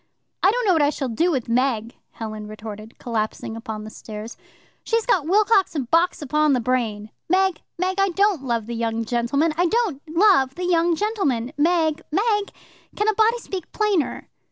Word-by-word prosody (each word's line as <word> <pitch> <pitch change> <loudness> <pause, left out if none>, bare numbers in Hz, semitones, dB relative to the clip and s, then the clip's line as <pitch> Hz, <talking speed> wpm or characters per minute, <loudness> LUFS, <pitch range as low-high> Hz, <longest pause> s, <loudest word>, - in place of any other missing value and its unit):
"I 380 - +5
don't 485 +3 0
know 380 - +4
what 320 - +3
I 290 - +4
shall 275 -3 -3
do 280 +11 +1
with 265 -8 -1
Meg," 235 -1 0 0.2
Helen 215 -2 -6
retorted, 215 +1 -9
collapsing 225 -1 -3
upon 220 -2 -6
the 215 - -9
stairs. 215 +2 -8 0.5
"She's 455 -1 0
got 370 -12 +2
Wilcox 400 -1 +3
and 260 -5 -3
Box 335 -1 +2
upon 300 +1 +2
the 255 - +2
brain. 220 -4 -1 0.2
Meg, 380 -1 +2 0.2
Meg, 370 +2 -1
I 390 0 +3
don't 390 -2 +2
love 235 -4 -1
the 235 - -5
young 230 0 -2
gentleman; 255 +7 +1
I 350 +1 +3
don't 410 - 0
love 325 -6 +3
the 360 - -3
young 340 -1 +2
gentleman, 300 - -1
Meg, 320 0 +2
Meg. 415 +3 +1 0.4
Can 420 +1 +1
a - - +3
body 445 +3 +3
speak 380 -7 -7
plainer?" 415 -8 0
305 Hz, 180 wpm, -23 LUFS, 230-380 Hz, 0.5 s, I